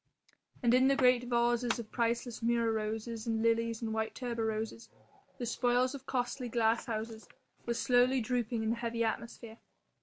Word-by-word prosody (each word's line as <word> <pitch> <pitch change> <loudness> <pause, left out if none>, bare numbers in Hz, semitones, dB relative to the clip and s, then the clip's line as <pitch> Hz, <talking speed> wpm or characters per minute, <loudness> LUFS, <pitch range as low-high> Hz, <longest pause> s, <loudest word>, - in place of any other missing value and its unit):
And 240 0 +4
in 255 +1 +5
the 275 - +4
great 250 -2 +4
vases 240 0 +1
of 230 -2 -8
priceless 235 0 -1
murra 230 0 +2
roses 220 +1 -3
and 225 -1 0
lilies 230 0 +1
and 220 -1 -2
white 220 0 -2
tuberoses, 225 -2 -3 0.5
the 245 - -3
spoils 245 +2 +1
of 275 -1 -9
costly 245 0 -2
glasshouses, 225 -1 -1 0.4
were 235 - 0
slowly 250 +2 +3
drooping 235 -1 -1
in 220 - +1
the - - +1
heavy 235 -1 -1
atmosphere. 230 0 -4
235 Hz, 155 wpm, -32 LUFS, 225-245 Hz, 0.5 s, in